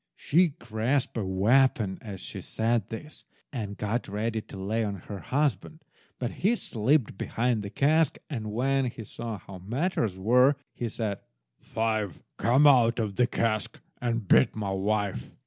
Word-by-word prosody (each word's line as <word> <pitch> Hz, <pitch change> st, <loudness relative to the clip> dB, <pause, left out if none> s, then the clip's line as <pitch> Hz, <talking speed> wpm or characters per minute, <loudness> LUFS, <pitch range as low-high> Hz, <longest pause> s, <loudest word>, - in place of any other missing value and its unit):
She 175 Hz, +5 st, +3 dB
grasped 120 Hz, +5 st, -1 dB
a 115 Hz, -, -1 dB
weapon 105 Hz, +1 st, +2 dB
as 100 Hz, -4 st, -7 dB
she -, -, -5 dB
said 115 Hz, -2 st, 0 dB
this, 150 Hz, +7 st, -8 dB, 0.3 s
and 105 Hz, -5 st, -4 dB
got 110 Hz, +3 st, -2 dB
ready 110 Hz, +2 st, -2 dB
to 100 Hz, -, -11 dB
lay 105 Hz, +4 st, -1 dB
on 100 Hz, -2 st, -2 dB
her 100 Hz, +2 st, -8 dB
husband, 145 Hz, -, -1 dB, 0.3 s
but 120 Hz, -2 st, -2 dB
he 215 Hz, +6 st, +1 dB
slipped 120 Hz, -, +1 dB
behind 120 Hz, -1 st, 0 dB
the 100 Hz, -, -5 dB
cask, 150 Hz, +6 st, +2 dB
and 110 Hz, -8 st, -4 dB
when 135 Hz, +4 st, +1 dB
he 115 Hz, -2 st, -5 dB
saw 115 Hz, +1 st, -5 dB
how 95 Hz, -1 st, -11 dB
matters 115 Hz, -, -1 dB
were, 125 Hz, +8 st, +4 dB, 0.2 s
he 120 Hz, -, -3 dB
said— 105 Hz, -3 st, -3 dB, 0.4 s
"Five, 110 Hz, -5 st, -2 dB
come 130 Hz, +6 st, +4 dB
out 120 Hz, -5 st, +6 dB
of 105 Hz, -4 st, -2 dB
the 125 Hz, +2 st, +3 dB
cask 110 Hz, -3 st, -1 dB, 0.2 s
and 115 Hz, -4 st, -1 dB
beat 65 Hz, -, +5 dB
my 105 Hz, -3 st, -2 dB
wife!" 100 Hz, -6 st, -1 dB
115 Hz, 160 wpm, -28 LUFS, 105-125 Hz, 0.4 s, out